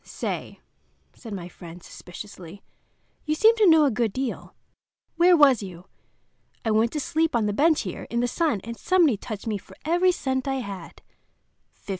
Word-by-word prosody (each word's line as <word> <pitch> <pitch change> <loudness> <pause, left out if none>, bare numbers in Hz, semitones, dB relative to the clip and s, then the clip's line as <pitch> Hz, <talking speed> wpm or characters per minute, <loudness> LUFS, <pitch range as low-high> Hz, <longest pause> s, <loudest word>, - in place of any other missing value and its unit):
"Say," - - -5 0.5
said 230 - -11
my 185 -4 -6
friend, 175 -1 -12
suspiciously, 185 0 -11 0.6
"you 305 -1 -1
seem 445 +7 +5
to 420 -4 +5
know 320 -2 +6
a 275 - +2
good 230 -1 0
deal. 260 +2 -5 0.6
Where 350 +1 +5
was 275 -7 +5
you? 180 -3 -9 0.8
I 220 - +1
went 220 +2 +2
to 300 - -2
sleep 320 +1 0
on 225 -2 +2
the 205 - -1
bench 310 +7 +3
there, 185 - -6
in 235 - -3
the 245 - +1
sun, 245 - 0
and 235 +1 -6
somebody 340 - +3
touched 210 0 -7
me 215 -3 -2
for - - -17
every 350 +3 +3
cent 260 -5 -2
I 270 - 0
had—$15." 200 -9 -7
240 Hz, 175 wpm, -25 LUFS, 205-315 Hz, 0.8 s, know